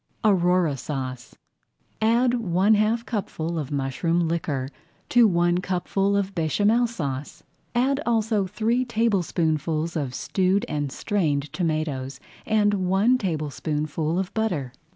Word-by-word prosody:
AURORA 180 Hz, -7 st, +3 dB
SAUCE 130 Hz, -3 st, -5 dB, 0.7 s
Add 235 Hz, +3 st, +3 dB
one 200 Hz, -3 st, +2 dB
half 220 Hz, +3 st, +2 dB
cupful 170 Hz, -8 st, -3 dB
of 145 Hz, -3 st, -4 dB
mushroom 160 Hz, +5 st, 0 dB
liquor 150 Hz, -5 st, -2 dB, 0.4 s
to 240 Hz, -2 st, +6 dB
one 175 Hz, -1 st, +2 dB
cupful 190 Hz, +2 st, 0 dB
of 200 Hz, -1 st, -1 dB
Béchamel 205 Hz, +8 st, +2 dB
Sauce. 145 Hz, -, -5 dB, 0.3 s
Add 270 Hz, +4 st, +2 dB
also 220 Hz, -4 st, +1 dB
three 230 Hz, +6 st, 0 dB
tablespoonfuls 170 Hz, -, 0 dB
of 135 Hz, -5 st, -2 dB
stewed 190 Hz, -, +1 dB
and 145 Hz, -2 st, -2 dB
strained 150 Hz, -7 st, -1 dB
tomatoes, 155 Hz, -5 st, -2 dB, 0.3 s
and 210 Hz, -1 st, +3 dB
one 210 Hz, +7 st, +3 dB
tablespoonful 155 Hz, -, -2 dB
of 190 Hz, 0 st, -2 dB
butter. 175 Hz, -, -1 dB
180 Hz, 115 wpm, -24 LUFS, 155-215 Hz, 0.7 s, to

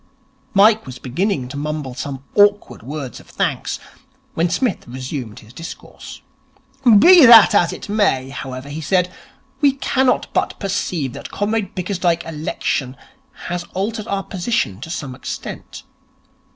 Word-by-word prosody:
Mike 210 Hz, -2 st, +5 dB
was 125 Hz, -1 st, -8 dB
beginning 140 Hz, -, -2 dB
to 130 Hz, -, -9 dB
mumble 150 Hz, -3 st, -4 dB
some 135 Hz, +1 st, -6 dB
awkward 205 Hz, 0 st, +3 dB
words 135 Hz, 0 st, -6 dB
of -, -, -17 dB
thanks, -, -, -2 dB, 0.5 s
when 170 Hz, +2 st, +1 dB
Psmith 225 Hz, -, -1 dB
resumed 125 Hz, -2 st, -6 dB
his 110 Hz, +2 st, -17 dB
discourse. 165 Hz, +5 st, -10 dB, 0.7 s
'Be 350 Hz, -, +8 dB
that 230 Hz, -2 st, +9 dB
as 175 Hz, -, +3 dB
it -, -, -8 dB
may, 200 Hz, -11 st, +1 dB
however,' 135 Hz, 0 st, -7 dB
he 155 Hz, +3 st, -5 dB
said, 180 Hz, +3 st, +1 dB, 0.5 s
'we 280 Hz, -2 st, +5 dB
cannot 265 Hz, -1 st, +1 dB
but -, -, -1 dB
perceive 180 Hz, -, -2 dB
that -, -, -8 dB
Comrade 210 Hz, 0 st, -2 dB
Bickersdyke's 180 Hz, -2 st, -1 dB
election 150 Hz, -4 st, -3 dB, 0.5 s
has 175 Hz, 0 st, -2 dB
altered 210 Hz, +3 st, -3 dB
our 195 Hz, -1 st, -2 dB
position 185 Hz, -, -2 dB
to 160 Hz, -, -7 dB
some 145 Hz, -5 st, -5 dB
extent. 130 Hz, -, -7 dB
170 Hz, 140 wpm, -19 LUFS, 135-205 Hz, 0.7 s, that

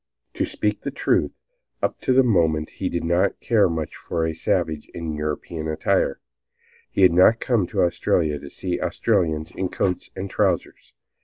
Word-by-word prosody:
To -, -, 0 dB
speak -, -, -2 dB
the -, -, -3 dB
truth, -, -, 0 dB, 0.4 s
up -, -, -1 dB
to 130 Hz, -, +2 dB
that 135 Hz, +1 st, +6 dB
moment 80 Hz, -9 st, +2 dB
he 95 Hz, -, -3 dB
did 85 Hz, -, -2 dB
not 85 Hz, +4 st, +1 dB
care 110 Hz, -6 st, +3 dB
much 80 Hz, -2 st, -3 dB
for 80 Hz, -1 st, -2 dB
a 80 Hz, -, -1 dB
savage 80 Hz, -1 st, -1 dB
in 80 Hz, -2 st, -4 dB
European 75 Hz, +1 st, -4 dB
attire. 80 Hz, -1 st, 0 dB, 0.7 s
He 95 Hz, -, +1 dB
had 90 Hz, -2 st, +6 dB
not 95 Hz, +6 st, +6 dB
come 115 Hz, -8 st, +1 dB
to -, -, +1 dB
Australia 80 Hz, -3 st, +1 dB
to 70 Hz, -, -10 dB
see 90 Hz, +3 st, -3 dB
Australians 80 Hz, -2 st, 0 dB
in 95 Hz, -1 st, -3 dB
coats 90 Hz, 0 st, -1 dB
and 95 Hz, -, -4 dB
trousers. 95 Hz, -4 st, -1 dB
85 Hz, 170 wpm, -23 LUFS, 80-95 Hz, 0.7 s, that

